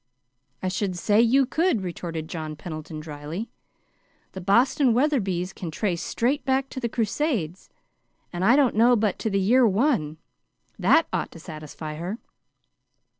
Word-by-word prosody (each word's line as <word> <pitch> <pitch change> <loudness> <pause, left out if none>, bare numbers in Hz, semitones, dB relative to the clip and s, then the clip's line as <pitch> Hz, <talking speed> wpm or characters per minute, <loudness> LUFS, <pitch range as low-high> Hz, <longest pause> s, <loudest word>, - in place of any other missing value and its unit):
"I - - 0
should 185 0 -2
say 205 +5 +3
you 260 +4 +4
could," 315 - +1
retorted 165 -3 -5
John 155 -2 -5
Pendleton, 155 0 -7
dryly. 155 +7 -6 0.8
"The 190 - -7
Boston 235 +6 +3
Wetherbys 195 - 0
can 175 - -6
trace 175 +1 -2
straight 260 +5 -1
back 270 0 0
to 260 - -6
the 235 -2 -2
crusades, 220 - -2 0.6
and 175 +1 -2
I 230 +6 +6
don't 275 -4 +3
know 235 +3 +5
but 210 -4 0
to 220 - -1
the 195 -1 +1
year 235 +6 +4
one. 205 - +1 0.6
That 325 - +4
ought - - -2
to 165 - -11
satisfy 155 -1 -8
her. 180 +7 -4
195 Hz, 150 wpm, -25 LUFS, 165-245 Hz, 0.8 s, I